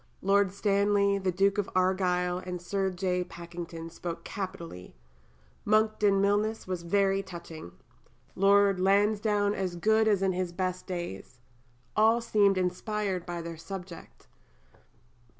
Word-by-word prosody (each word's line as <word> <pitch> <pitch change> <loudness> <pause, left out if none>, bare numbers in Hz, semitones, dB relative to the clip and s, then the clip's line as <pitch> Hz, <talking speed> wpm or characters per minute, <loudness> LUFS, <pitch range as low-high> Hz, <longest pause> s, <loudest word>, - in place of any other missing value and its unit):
Lord 195 0 +3
Stanley, 200 0 +2
the 190 -1 0
Duke 195 +3 +2
of 200 - -1
Argyll, 180 -1 +1
and 180 -1 -6
Sir 190 +2 -1
J. 180 0 -1
Pakington 170 -1 -8
spoke 170 0 -6
capitally. 170 - -7 0.7
Monckton 215 -2 +3
Milnes 205 +3 +1
was 185 -2 -3
very 195 +2 +1
touching. 170 - -10 0.6
Lord 200 0 +4
Lansdowne 205 +1 +2
as 185 -3 -3
good 220 +5 +3
as 200 -3 +2
in 190 - +2
his 180 -1 -3
best 185 0 -3
days. 150 - -6 0.6
All 220 +2 +4
seemed 205 -4 +3
inspired 185 0 -2
by 175 -1 -4
their 165 -1 -7
subject. 175 - -9
190 Hz, 125 wpm, -29 LUFS, 175-200 Hz, 0.7 s, Lord